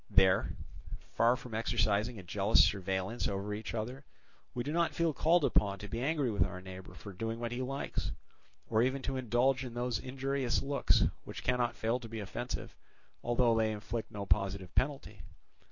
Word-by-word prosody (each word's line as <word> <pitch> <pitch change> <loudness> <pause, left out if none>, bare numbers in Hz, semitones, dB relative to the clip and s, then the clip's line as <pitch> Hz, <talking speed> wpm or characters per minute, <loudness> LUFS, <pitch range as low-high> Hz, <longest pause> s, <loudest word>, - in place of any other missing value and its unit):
There, 95 0 +4 0.6
far 115 +2 +4
from 125 -2 -9
exercising 110 +1 +1
a 95 - -8
jealous 100 +4 +4
surveillance 95 +3 -1
over 100 +1 -2
each 110 +2 -5
other, 125 +6 -4 0.5
we 120 - -1
do 145 - -3
not 170 +1 +1
feel 170 -2 +2
called 165 +2 +4
upon 100 -1 +2
to 105 - -7
be 115 +4 -3
angry 140 -3 +1
with 105 - +3
our 90 -1 -5
neighbour 95 0 -9
for 100 - -9
doing 115 +4 -3
what 120 0 -3
he 120 +1 -2
likes, 135 +2 -3 0.6
or 110 -1 +3
even 130 +2 +1
to 135 - -2
indulge 125 +2 +2
in 120 -2 -7
those 120 -1 -1
injurious 135 -1 -1
looks 140 0 +3 0.2
which - - -8
cannot 125 -1 +1
fail 115 +3 0
to 115 -2 -9
be 115 0 -5
offensive, 120 +4 -5 0.5
although 120 -1 +3
they 110 -1 +2
inflict 110 +2 -4
no 100 -1 -5
positive 100 -2 0
penalty. 125 - -1
115 Hz, 180 wpm, -33 LUFS, 105-130 Hz, 0.6 s, There